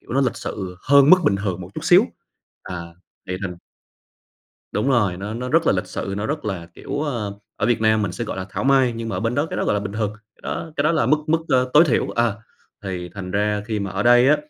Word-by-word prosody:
kiểu, - - -17
nó 135 - +2
lịch 130 - 0
sự 90 -2 -5
hơn 140 +1 +6
mức 185 - +10
bình 100 - +3
thường 95 -3 -2
một 90 0 -9
chút - - -6
xíu. - - +6 0.6
À, 90 -2 -6 0.4
thì 90 - -2
thành 90 -3 -4 1.2
Đúng 105 +6 0
rồi, 105 -8 +2
nó 105 +4 -5
nó 125 +2 -4
rất 160 +3 +2
là - - +5
lịch 90 - -1
sự, 95 - -4
nó 105 +1 -2
rất 150 +1 -3
là 95 -5 -4
kiểu, 145 - -5
ờ, 115 -9 -3 0.2
ở - - 0
Việt 120 -2 +2
Nam 110 -1 +3
mình 105 - -2
sẽ 120 - -4
gọi - - -5
là 95 0 -4
thảo - - -3
mai, 135 -2 +4
nhưng 115 0 -4
mà - - -3
ở - - -2
bên 115 +2 -1
đó 145 +3 +1
cái - - -5
đó - - 0
gọi - - +1
là 100 - 0
bình 100 -1 -5
thường, 105 -1 -1
cái 110 +1 -23
đó 160 - -5
cái 145 - +1
đó 155 - +3
là 160 - +2
mức 155 - +5
mức, 160 +1 +3
ơ, 130 0 +2
tối 155 +3 +8
thiểu. 135 - +1
À, 120 -2 +1 0.5
thì 90 -3 -4
thành 95 -2 -6
ra 105 +1 0
khi 110 -2 -2
mà 100 -1 -3
ở 95 +2 -1
đây 120 +2 +6
á, 150 - +6
110 Hz, 275 wpm, -22 LUFS, 100-130 Hz, 1.2 s, mức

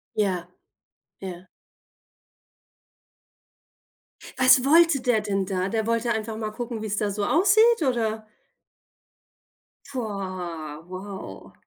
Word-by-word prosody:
Ja. 185 -4 -1 0.7
Ja. 185 -1 -8 2.9
Was 255 0 +6
wollte 325 0 +5
der 245 -3 +2
denn 195 -2 -1
da? 185 0 -1
Der 220 +1 -1
wollte 230 +1 0
einfach 220 0 -3
mal 215 -1 -3
gucken, 230 0 -5
wie - - -3
es 210 -1 -2
da 205 0 0
so 205 +1 -2
aussieht, 405 - +4
oder? 220 -3 -1 1.7
Boah, 185 - -5
wow. 185 - -8
215 Hz, 105 wpm, -25 LUFS, 190-245 Hz, 2.9 s, Was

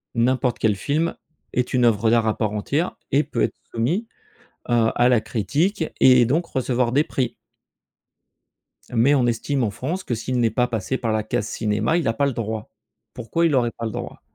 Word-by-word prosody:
N'importe 125 +1 +1
quel 110 -2 +2
film 155 - 0 0.4
est 125 0 -1
une 125 -1 +3
œuvre 110 -1 +3
d'art 115 -1 +3
à 110 - 0
part 110 -2 -1
entière 140 - -1 0.2
et 145 +2 +3
peut - - -3
être - - -1 0.2
soumis 165 - 0 0.6
à 115 -2 +2
à 120 +2 +2
la 120 -3 +4
critique 150 - -1 0.2
et 125 -2 +7
donc 155 +9 +1
recevoir 125 -3 0
des 140 +4 +3
prix. 125 -3 -2 1.6
Mais 125 +5 +4
on 130 -3 +2
estime 120 +3 0
en 110 - 0
France 160 - -4
que, 125 - -3
s'il 125 +2 -2
n'est 115 -2 +2
pas 125 +2 +1
passé 115 +2 -2
par 115 -3 -2
la 110 0 0
case 105 -1 -2
cinéma, 110 +8 0
il 170 - 0
a 115 - +2
pas 140 +5 +1
le 140 - -1
droit. 110 -2 -4 0.4
Pourquoi 130 +8 -1
il 155 -4 +2
aurait 120 -2 +2
pas 115 - -4
le 110 - -2
droit? - - -7
120 Hz, 200 wpm, -22 LUFS, 115-140 Hz, 1.6 s, et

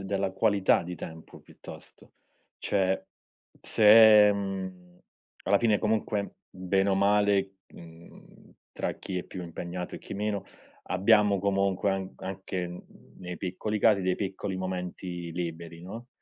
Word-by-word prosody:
della 95 0 -2
qualità 95 0 +2
di 90 - -6
tempo, 80 0 -10
piuttosto. - - -14 0.5
Cioè, 95 -1 0 0.6
se 105 -1 +7
mhmm, 95 -3 -6 0.5
alla - - +3
fine, 110 -3 +2
comunque, 105 -2 -1
bene 95 +2 0
o - - +3
male, 100 0 +2 0.2
mhmm, 85 0 -16 0.2
tra - - -3
chi 95 - -5
è 90 - -6
più 90 - -8
impegnato 85 +1 -6
e - - -9
chi - - -9
meno, 105 0 -2 0.4
abbiamo 100 +2 +3
comunque 100 0 +1
an 95 -1 -3
anche 90 -2 -5 0.4
nei 90 -1 -7
piccoli 100 +3 -3
casi 105 -2 +4
dei 90 0 +1
piccoli 95 0 -4
momenti 90 -2 -5
liberi, 85 -1 -6
no, 115 +7 -9
95 Hz, 130 wpm, -28 LUFS, 90-100 Hz, 0.6 s, se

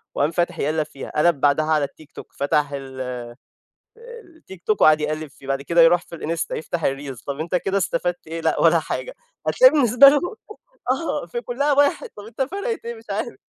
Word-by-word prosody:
وقام 145 +3 +1
فاتح 175 0 -1
يقلِّب 155 +2 0
فيها، 135 - -9
قلَّب 160 -3 +3
بعدها 145 +2 +3
على 155 -2 +2
الTikTok، 150 +1 -13 0.2
فتح 145 +1 +1
ال 130 -2 -6 1.2
الTikTok 190 - -4
وقعد 155 0 +6
يقلِّب 155 0 -3
فيه، 135 0 -16
بعد 135 0 -1
كده 170 +4 +3
يروح 170 +1 +5
في 170 - -11
الInsta، 165 +1 -3
يفتح 165 +1 -4
الreels. 135 -3 -3
طب، 140 0 -4
أنت 165 +3 -2
كده 195 +2 0
استفدت 175 -2 -2
إيه؟ 165 +1 -5
لأ، 160 -1 0
ولا 165 0 +5
حاجة. - - -5 0.3
هتلاقي - - +6
بالنسبة 260 -1 +6
له 290 0 +3 0.7
آه، 300 +5 -3
فكلّها 475 -12 -1
واحد. 285 - +2
طب، 205 - -10
أنت 230 +4 -3
فرِّقت 400 - -4
إيه؟ 235 0 -5
مش 225 - -15
عارف. 200 -9 -3
165 Hz, 180 wpm, -22 LUFS, 145-230 Hz, 1.2 s, وقعد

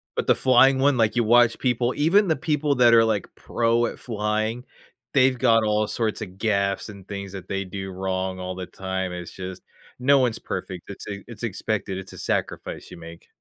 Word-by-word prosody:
But - - -2
the - - +5
flying 130 +1 +5
one, 140 +1 +4
like, 115 -1 +2
you 120 - +4
watch 120 +1 +4
people 125 -1 +1
even 180 +8 +4
the 160 - +3
people 150 -1 0
that 120 -2 +5
are, 115 -1 +7
like, 110 -2 0
pro 115 0 +1
at - - -5
flying, 110 +1 -2 0.5
they've 130 -2 +4
got 115 -3 +4
all 105 0 +1
sorts 110 -1 -2
of - - -5
gaffes 100 0 -1
and 100 -3 -11
things 100 -1 -6
that 95 -2 -9
they 100 0 -2
do 95 +1 -6
wrong 95 0 -3
all 90 0 -5
the 95 0 -5
time. 95 0 -4
It's 90 -1 -7
just 95 -1 -7 0.4
no 140 +2 +4
one's 120 -3 +1
perfect. 90 -3 -6
It's 100 - -8
e 100 -1 -6
it's 115 -1 -11
expected. 105 -2 -2
It's 95 0 -8
a - - -11
sacrifice - - -3
you - - -9
make. 85 0 -12
110 Hz, 205 wpm, -24 LUFS, 95-125 Hz, 0.5 s, are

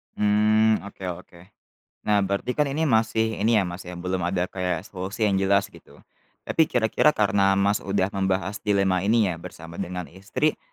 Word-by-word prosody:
Mmm, 110 +1 +3
oke 95 - -12 0.2
oke. 85 - -17 0.7
Nah 105 -1 +3
berarti 100 +5 -1
kan 150 - +1
ini 155 +3 0
masih 110 -2 +1
ini 115 0 +4
ya, 100 - +2
Mas 90 +1 -7
ya, 90 - -7
belum 90 0 -2
ada 90 +1 0
kayak 90 -1 -3
solusi 95 +3 -6
yang 100 -2 +2
jelas 100 +1 +2
gitu, - - -17 0.5
tapi 160 - +3
kira-kira 125 +5 +2
karena 100 -2 +3
Mas 100 +1 +2
udah 95 -1 0
membahas 95 +1 -1
dilema 100 -3 +2
ini 110 -3 +3
ya - - -3
bersama 85 0 -10
dengan 90 -1 -4
istri, 100 - -1
100 Hz, 175 wpm, -24 LUFS, 95-110 Hz, 0.7 s, ini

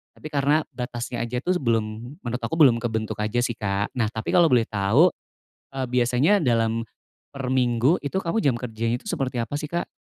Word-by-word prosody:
tapi - - -9
karena 145 +2 +2
batasnya 120 -1 -4
aja 125 +1 -3
tuh 180 +7 0
sebelum 115 0 -2
menurut 120 +1 -4
aku - - -3
belum 130 -6 +7
kebentuk 110 -2 -2
aja 110 +3 0
sih 120 -1 -1
Kak. 100 0 -2
Nah 110 -3 +2
tapi 110 -1 -5
kalo 170 -2 +6
boleh 120 -3 +3
tau, 110 - +3 0.6
eee, 135 - -1
biasanya 125 +10 +3
dalam 115 -4 +1 0.5
per 135 -2 -5
minggu 125 +4 +2
itu 190 - -8
kamu 190 +5 -1
jam 130 -4 +3
kerjanya 115 0 -2
itu - - -11
seperti 135 -6 -2
apa 130 +5 -4
sih 150 - -5
Kak? 170 - -2
125 Hz, 190 wpm, -24 LUFS, 115-140 Hz, 0.6 s, belum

